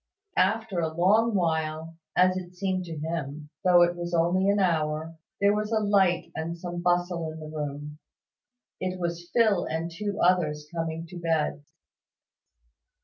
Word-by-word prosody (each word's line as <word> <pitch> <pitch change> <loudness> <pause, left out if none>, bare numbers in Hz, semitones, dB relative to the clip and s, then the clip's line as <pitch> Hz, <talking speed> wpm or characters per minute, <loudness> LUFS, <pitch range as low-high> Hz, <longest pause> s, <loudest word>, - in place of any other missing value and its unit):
After 220 -4 +1
a 160 -1 0
long 205 +7 +3
while, 160 -2 -1 0.2
as 185 0 +4
it 180 -1 -6
seemed 185 -1 -1
to 165 -2 -6
him, 150 -1 -4
though 180 -2 +6
it 175 0 +2
was 175 0 -3
only 180 +4 +3
an 200 - +3
hour, 160 -3 0 0.2
there 200 0 +4
was 210 +1 -2
a 220 - +3
light 195 -4 +2
and 165 +2 -4
some 175 0 -5
bustle 175 -2 0
in 160 - -9
the 155 - -8
room. 150 0 -5 0.8
It 185 0 -3
was 170 0 -3
Phil 215 -6 +3
and 165 +2 -3
two 205 +2 -3
others 155 -5 +2
coming 165 0 -3
to 180 -1 -8
bed. 160 -3 0
175 Hz, 155 wpm, -27 LUFS, 160-185 Hz, 0.8 s, though